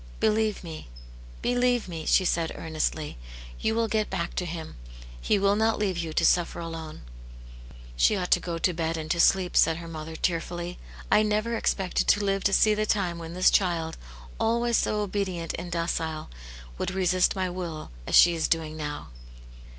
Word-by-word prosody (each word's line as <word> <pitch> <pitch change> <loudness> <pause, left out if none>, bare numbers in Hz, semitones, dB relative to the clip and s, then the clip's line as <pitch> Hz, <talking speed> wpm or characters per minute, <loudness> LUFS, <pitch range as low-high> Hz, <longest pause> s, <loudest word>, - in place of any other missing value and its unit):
Believe 215 -1 +1
me, 160 - -8 0.5
believe 245 -2 +1
me," 165 -3 -6
she 185 - +4
said 165 -2 0
earnestly, 155 - -3 0.2
" - - -14
you 220 - +1
will 230 0 +1
get 215 -1 0
back 170 0 -3
to 180 - -1
Him; 165 -1 -6 0.5
He 205 - +2
will 200 +1 +3
not 220 +1 +2
leave 200 -3 0
you 165 -2 -3
to - - +1
suffer 175 -1 +2
alone." 165 -2 -7 0.5
" - - -16
She - - +4
ought 180 -1 -3
to - - +6
go 170 -1 -4
to 180 +2 +1
bed 165 0 -2
and 155 -1 -4
to 170 - 0
sleep/' 185 +1 +3
said 165 -1 +4
her 170 0 -8
mother, 160 0 -7
tearfully. 175 +1 -2 0.2
" - - -15
I 210 - +6
never 215 +2 0
expected 190 -4 0
to 205 0 +3
live 195 0 0
to 200 - +4
see 215 +2 +5
the 215 0 -1
time 180 -5 0
when 165 +1 -7
this 185 - +4
child, 170 -4 +1 0.4
always 235 +1 +1
so 210 0 0
obedient 190 -5 -2
and 175 0 -7
docile, 160 - -2 0.5
would - - -1
resist 185 0 +2
my 190 -1 0
will 175 - -6 0.2
as - - +1
she 175 - +8
is 160 -1 0
doing 160 -1 -1
now." 150 -1 -5
175 Hz, 190 wpm, -27 LUFS, 160-200 Hz, 0.5 s, she